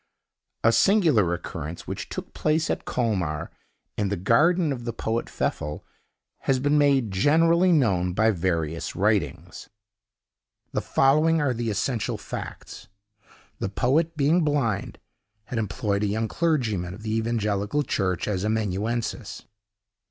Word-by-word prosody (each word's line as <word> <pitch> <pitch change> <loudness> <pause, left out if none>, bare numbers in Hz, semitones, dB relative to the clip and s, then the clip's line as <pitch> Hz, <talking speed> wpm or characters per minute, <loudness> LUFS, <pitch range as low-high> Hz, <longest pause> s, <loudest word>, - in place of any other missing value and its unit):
A 115 - +6
singular 155 - +4
occurrence, 85 -1 -5
which - - -6
took - - -7
place 155 +1 +1
at - - -3
Colmar, 95 - -1 0.4
in 105 -2 -1
the 100 - 0
garden 150 - +3
of 120 -3 -7
the 120 -1 -3
poet 115 +1 -2
Pfeffel, 75 0 -3 0.5
has 135 - +1
been 145 +3 +1
made 140 -6 +3
generally 165 - +4
known 95 - +2
by 110 +2 +4
various 85 -4 -2
writings. 105 -3 -1 1.0
The - - -1
following 155 +4 +3
are 145 -4 +1
the 115 -1 -2
essential 110 -1 -1
facts. - - -8 0.7
The - - -2
poet, 155 - +1
being 155 +5 +3
blind, 135 -9 -1 0.5
had 115 +1 -4
employed 100 -1 -1
a 105 - +1
young 110 +2 -1
clergyman, 110 - -1
of 110 - -13
the 110 0 -1
evangelical 110 +3 0
church, 95 - -1
as 100 -3 -1
amanuensis. 110 +2 -2
115 Hz, 130 wpm, -25 LUFS, 100-145 Hz, 1.0 s, A